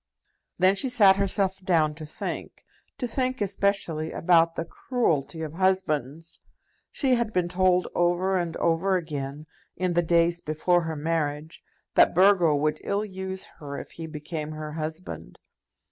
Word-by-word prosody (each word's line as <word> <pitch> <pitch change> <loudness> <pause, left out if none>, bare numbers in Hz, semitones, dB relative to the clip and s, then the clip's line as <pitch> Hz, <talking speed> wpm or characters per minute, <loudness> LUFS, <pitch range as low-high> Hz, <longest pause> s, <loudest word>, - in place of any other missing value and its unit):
Then 185 +2 +4
she 260 +6 0
sat 205 -6 +5
herself 195 -1 0
down 160 -5 +2
to 155 0 -9
think, - - -6 0.3
to 245 - -2
think 255 +2 -1
especially 195 -6 -1
about 165 -1 +3
the 165 - -3
cruelty 165 - -1
of 155 -1 -6
husbands. 165 -5 -1 0.5
She 265 -3 +1
had 235 -3 +1
been 180 -4 0
told 180 0 +2
over 175 +2 +1
and 175 -3 -2
over 170 +3 +1
again, 150 -4 -4 0.3
in 180 -1 -1
the 175 - +3
days 170 0 +2
before 175 +3 +1
her 160 -1 -3
marriage, 150 0 -3 0.3
that - - +5
Burgo 180 -4 +5
would 150 +1 0
ill 205 +1 -1
use 190 -1 -5
her 140 -2 -6
if - - -8
he 165 -1 -7
became 155 0 -6
her 155 0 -6
husband. 155 - -6
170 Hz, 150 wpm, -26 LUFS, 155-190 Hz, 0.5 s, sat